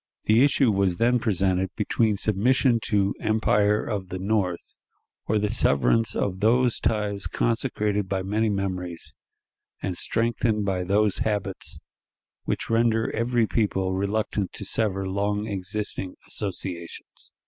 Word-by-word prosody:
The 110 +4 +4
issue 140 -4 +3
was 95 -3 +1
then 120 +3 +3
presented 95 -4 +1
between 110 0 +1
submission 115 +5 +2
to 100 -1 +1
empire 105 -1 +2
of 100 -4 -4
the 95 - -4
North, 95 -3 -2 0.5
or 110 - +2
the 105 0 0
severance 110 - +3
of 95 -2 -1
those 120 +3 +3
ties 105 -2 0
consecrated 105 -4 -1
by 95 -1 -1
many 110 +3 0
memories, 90 -4 -3 0.7
and 90 - -3
strengthened 115 0 0
by 95 -2 -1
those 100 +1 +2
habits 105 -3 -2 0.7
which - - -2
render 115 0 +1
every 115 0 +1
people 95 -4 0
reluctant 100 0 -1
to - - -3
sever 95 -3 0
long 100 +2 -1
existing 100 -1 -4
associations. 90 -4 -6
105 Hz, 125 wpm, -25 LUFS, 95-110 Hz, 0.7 s, The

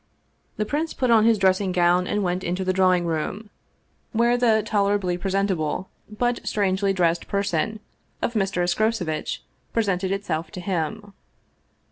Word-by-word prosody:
The 215 - 0
prince 305 +7 -2
put 255 -2 +1
on 220 -1 +6
his 230 -1 +5
dressing 190 0 +2
gown 180 0 +3
and 205 0 0
went 180 0 -1
into 180 +2 -2
the 185 - +1
drawing 185 -2 +3
room, 175 +6 -3 0.6
where 235 +2 +3
the 225 -3 +3
tolerably 200 -4 +1
presentable 190 -2 -1 0.2
but 240 +3 -1
strangely 195 -1 +1
dressed 170 -3 +1
person 200 +1 -1 0.4
of 235 - -1
Mr. 195 -4 0
Escrocevitch 175 -3 -1 0.3
presented 195 -4 0
itself 195 -5 -2
to - - -6
him. 195 +3 -3
195 Hz, 140 wpm, -24 LUFS, 180-215 Hz, 0.6 s, on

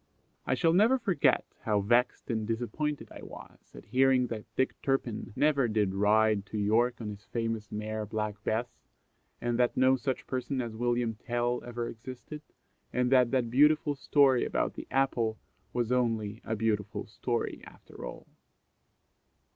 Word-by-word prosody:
I - - +2
shall 165 -2 +3
never 220 +8 +5
forget 200 -8 +2
how 105 -2 +1
vexed 120 +4 +1
and 110 -2 -2
disappointed 125 +6 -2
I - - -10
was - - -13
at - - -11
hearing 130 +1 +3
that 110 -2 -5
Dick 130 - +1
Turpin 125 -5 -1
never 140 -4 +3
did 105 -3 +1
ride 105 +1 +3
to 110 - -5
York 115 +4 +2
on 110 -3 -4
his 100 +1 -11
famous 115 -3 -3
mare 105 0 -3
Black 105 -1 -3
Bess, 110 +3 0 0.7
and 120 0 -1
that 120 -1 +2
no 130 +1 +5
such 130 0 -3
person 130 +1 -2
as 115 -3 -3
William 120 0 0
Tell 120 +2 -2
ever 120 -1 -4
existed, 130 +6 -8 0.5
and 125 0 +1
that 125 -2 +5
that 125 -3 0
beautiful 150 +3 +4
story 135 -2 +3
about - - -1
the - - -8
apple 120 -5 +1 0.3
was 120 -1 -1
only 115 -3 0
a 110 - -2
beautiful 105 -1 -1
story 120 +2 -3
after - - -13
all. - - -7
120 Hz, 155 wpm, -30 LUFS, 110-130 Hz, 0.7 s, never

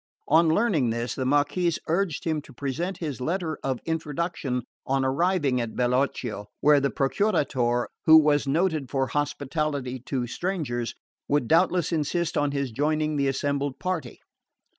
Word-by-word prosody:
On 160 +2 +5
learning 160 - +2
this, 120 +1 -2
the 130 -1 -2
Marquess 145 +5 +2
urged 170 -1 0
him 160 -2 -1
to 140 - -15
present 155 +8 -3
his 145 -7 -5
letter 165 +1 -2
of 130 -3 -1
introduction 155 -5 -2 0.2
on 135 0 0
arriving 140 -2 +1
at 115 -2 -5
Bellocchio, 125 -4 0
where 150 0 +5
the 140 0 +1
Procuratore, 135 - +1 0.2
who 160 0 +10
was 145 -2 +3
noted 155 -2 +1
for 135 -1 +1
hospitality 145 -2 -2
to 130 -3 -1
strangers, 120 -5 -3 0.3
would 145 -4 +1
doubtless 175 +2 +3
insist 165 +2 -1
on 145 0 +2
his 140 -2 -2
joining 155 +4 0
the 140 -1 +1
assembled 140 0 -1
party. 180 -9 -3
145 Hz, 145 wpm, -26 LUFS, 130-160 Hz, 0.3 s, who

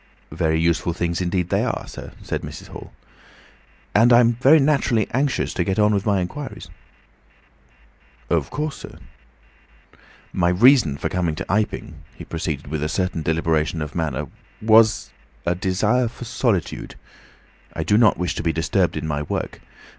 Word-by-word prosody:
"Very 80 -1 0
useful 85 +1 +1
things 85 +1 -2
indeed 90 0 -1
they - - +1
are, - - -3
sir," - - -9
said - - -3
Mrs. - - -9
Hall. - - -10 1.0
"And 115 +4 +5
I'm 120 0 +6
very 135 +6 +5
naturally 135 -7 +2
anxious 135 +2 0
to 90 - 0
get 95 +2 -1
on 105 0 +4
with 100 +1 -1
my 100 -2 +2
inquiries." 90 - -6 1.6
"Of - - 0
course, 150 -1 -3
sir." - - -11 1.4
"My 85 -1 +2
reason 100 - +5
for - - -2
coming 85 -3 -1
to 95 - -5
Iping," 100 -5 -1 0.2
he - - -10
proceeded, 80 -4 -4
with 75 +1 -4
a 75 - -1
certain 90 -1 -1
deliberation 80 0 0
of 75 -1 -5
manner, 80 -6 -2 0.3
"was... 110 0 +4 0.3
a 85 - +2
desire 105 +7 +1
for 120 +2 -8
solitude. 115 - -2 0.8
I - - -2
do 105 - +2
not 110 -2 +5
wish 90 0 -1
to - - -4
be 85 - +1
disturbed 80 0 0
in - - -4
my 75 -2 -2
work. 75 - -4
90 Hz, 160 wpm, -22 LUFS, 80-115 Hz, 1.6 s, I'm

